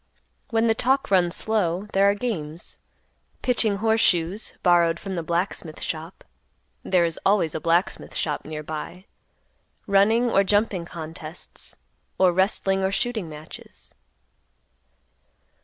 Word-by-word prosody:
When 225 0 +2
the 225 - +4
talk 270 +3 +1
runs 180 -2 +3
slow, 200 -4 0
there 195 +1 +5
are 200 - +2
games; 170 -9 -5 0.6
pitching 230 -5 +2
horse 220 +2 +2
shoes, 180 +5 +1
borrowed 170 -2 +4
from 195 -2 -6
the 175 - -2
blacksmith 170 -1 -2
shop—there 170 +2 -4
is 165 -1 -3
always 195 -6 +2
a - - -2
blacksmith 170 +3 0
shop 150 -2 -1
near 155 0 -6
by; 160 +4 -7 0.8
running 215 +5 +4
or 195 - +4
jumping 205 -3 +1
contests, 160 0 -7 0.4
or 185 -1 +5
wrestling 195 +1 +1
or 190 - +1
shooting 220 -4 -2
matches. 150 - -12
185 Hz, 125 wpm, -24 LUFS, 165-210 Hz, 0.8 s, there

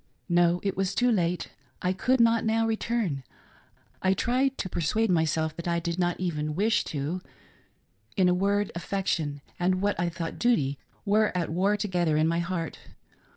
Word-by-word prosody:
No; 175 0 +4
it 195 -1 -1
was 195 +1 -1
too 245 0 +3
late 180 -4 0
— - - -37
I 180 0 +2
could 255 +7 +1
not 230 -1 +4
now 225 +1 +2
return; 220 - -1 0.4
— - - -35
I 190 0 +3
tried 260 +5 +1
to - - -2
persuade 185 +6 0
myself 160 -2 +1
that 170 - -5
I 170 0 +1
did 170 +1 -3
not 175 -1 0
even 155 -4 -2
wish 210 +3 +2
to; 150 +5 -3 0.5
— 105 +3 -36
in 185 -2 +4
a 180 - +4
word.s 200 +2 +1
affection, 170 -5 -2 0.2
and 185 +1 +2
what 200 -2 0
I 175 0 +1
thought 165 -1 -5
duty, 145 - +2 0.3
were 215 +1 +3
at 170 -3 -1
war 195 +5 +2
together 175 -7 +1
in 155 +1 +3
my 170 +1 +1
heart. 170 -2 -3
180 Hz, 185 wpm, -27 LUFS, 165-205 Hz, 0.5 s, No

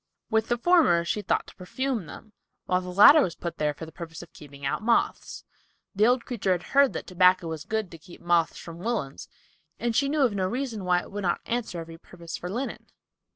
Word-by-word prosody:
With 220 0 +2
the 240 - 0
former 240 - +4
she 210 +5 -1
thought - - 0
to - - -15
perfume 225 - -3
them, 215 +8 -12 0.3
while 180 0 +1
the 180 - -7
latter 210 - +8
was 175 - -1
put 170 - -6
there 150 -1 0
for 160 - -8
the 160 - -12
purpose 165 0 -9
of 170 - -17
keeping 140 -1 -11
out 135 - -1
moths. 230 +2 0 0.5
The 210 +2 +3
old 245 0 +2
creature 200 -6 0
had 175 -1 -3
heard 280 -1 +3
that - - -5
tobacco 180 -1 +3
was 160 -1 -6
good 220 -3 -2
to 165 - -11
keep 175 +2 -14
moths 170 -1 +1
from 170 0 -10
woolens, 195 - -3 0.5
and 235 -1 -2
she 275 +2 +2
knew 295 -1 +2
of 240 -5 +2
no 190 -2 0
reason 235 -3 -4
why 180 -1 +2
it - - -13
would 205 +1 -4
not 175 -3 0
answer 230 -7 -3
every 165 0 -9
purpose 170 -2 -9
for 180 - -6
linen. 245 +8 -5
185 Hz, 225 wpm, -26 LUFS, 170-235 Hz, 0.5 s, latter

